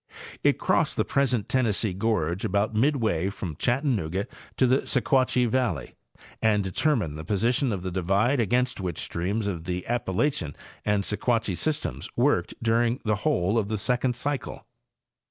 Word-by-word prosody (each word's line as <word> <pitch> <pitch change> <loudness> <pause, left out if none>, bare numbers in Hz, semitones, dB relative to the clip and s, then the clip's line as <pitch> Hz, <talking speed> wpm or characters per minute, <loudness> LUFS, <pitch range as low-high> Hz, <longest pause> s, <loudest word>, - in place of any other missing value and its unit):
It - - +4
crossed - - +1
the - - +2
present 130 -6 +1
Tennessee 110 -5 +1
gorge 95 -4 0
about 100 +3 0
midway 110 - +1
from 90 -5 -5
Chattanooga 115 - 0 0.3
to 130 - +4
the 130 +1 +4
Sequatchie 130 0 +2
valley 125 +1 -1 0.5
and 105 -2 +3
determined 95 - 0
the - - -6
posi 105 +7 +1
tion 130 0 0
of 95 -4 -3
the 95 - -3
divide 100 +9 +1
against 125 +1 +1
which 90 -4 -3
streams 100 +6 -2
of 85 -5 -3
the 90 0 -3
Appalachian 115 - -1 0.3
and 105 -1 +1
Sequatchie 110 -1 0
systems 155 - -2
worked 135 +5 +1
during 115 +2 +2
the 105 -1 +1
whole 110 - +1
of 105 - -2
the 110 0 -1
second 125 +3 0
eycle. 145 -2 -3
110 Hz, 155 wpm, -26 LUFS, 95-125 Hz, 0.5 s, It